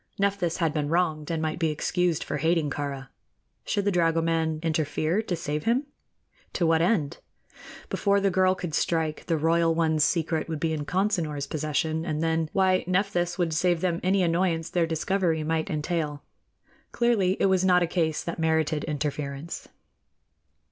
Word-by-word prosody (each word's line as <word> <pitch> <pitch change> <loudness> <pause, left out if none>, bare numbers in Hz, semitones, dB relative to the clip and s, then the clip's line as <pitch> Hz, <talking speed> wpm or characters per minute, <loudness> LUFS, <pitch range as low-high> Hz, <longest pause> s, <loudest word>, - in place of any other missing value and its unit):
Nephthys 195 -4 0
had 165 -4 0
been 150 -2 -1
wronged, 160 -3 0
and 160 -1 -1
might 155 +1 -2
be 165 -2 +1
excused 170 +2 0
for - - -3
hating 160 -1 +1
Kāra. 140 -2 -4 0.6
Should 200 - -1
the 205 - +2
dragoman 165 -2 +1
interfere 160 +3 0
to 190 -5 -3
save 150 -1 -3
him? 245 +5 +2 0.7
To 175 - +1
what 165 0 +3
end? 170 -5 +1 0.7
Before 200 0 +1
the 200 -1 +1
girl 185 +1 +3
could 175 -4 -5
strike, 160 -1 0
the 165 -2 +1
royal 165 +1 +2
one's 160 -2 +2
secret 160 0 0
would 160 -2 -3
be 160 +1 0
in 150 -2 -3
Consinor's 170 -6 -1
possession, 155 +2 -1
and 155 -2 -2
then 160 -1 0
why, 185 -1 +2
Nephthys 180 -1 0
would 170 -3 0
save 175 +1 +1
them 175 -2 0
any 190 +1 +2
annoyance 170 -1 0
their 170 -2 +1
discovery 165 0 0
might 160 +3 -1
entail. 150 -2 -2 0.7
Clearly, 210 -6 +2
it - - +3
was 190 -1 +3
not 180 -1 +4
a - - +3
case 165 -3 0
that 170 - -5
merited 160 -2 +1
interference. 145 0 -4
165 Hz, 165 wpm, -26 LUFS, 155-180 Hz, 0.7 s, not